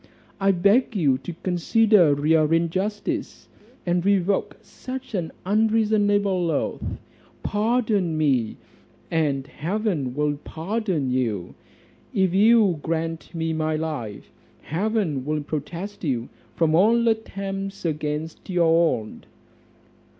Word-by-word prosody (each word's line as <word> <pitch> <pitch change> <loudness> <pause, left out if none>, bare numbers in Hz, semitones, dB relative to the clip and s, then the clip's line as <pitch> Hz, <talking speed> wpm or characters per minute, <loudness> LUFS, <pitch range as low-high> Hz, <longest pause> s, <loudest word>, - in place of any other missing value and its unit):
I 195 0 +2
beg 200 +7 +3
you 140 -9 +2
to 175 - -7
consider 180 -3 +4
your 155 -1 +4
injustice, 185 +6 -1 0.4
and 175 0 +1
revoke 200 0 +1
such 260 -1 -8
an 175 -5 -2
unreasonable 205 -3 +2
oath; 150 - -1 0.6
pardon 210 -6 +1
me, 135 -8 +1 0.5
and 145 -5 0
heaven 165 - -2
will 150 0 0
pardon 170 - -2
you; 110 -8 -1 0.6
if 190 -2 +2
you 205 -4 +5
grant 165 +1 -3
me 165 0 -1
my 155 0 0
life, 150 -10 -5 0.3
heaven 180 - -1
will 150 +1 -2
protest 170 +8 -5
you 125 -6 -1 0.3
from 160 -2 +2
all 230 +7 +4
attempts 195 -3 -3
against 155 +1 -3
your 170 -2 +3
own." 110 - -12
170 Hz, 105 wpm, -24 LUFS, 155-205 Hz, 0.6 s, you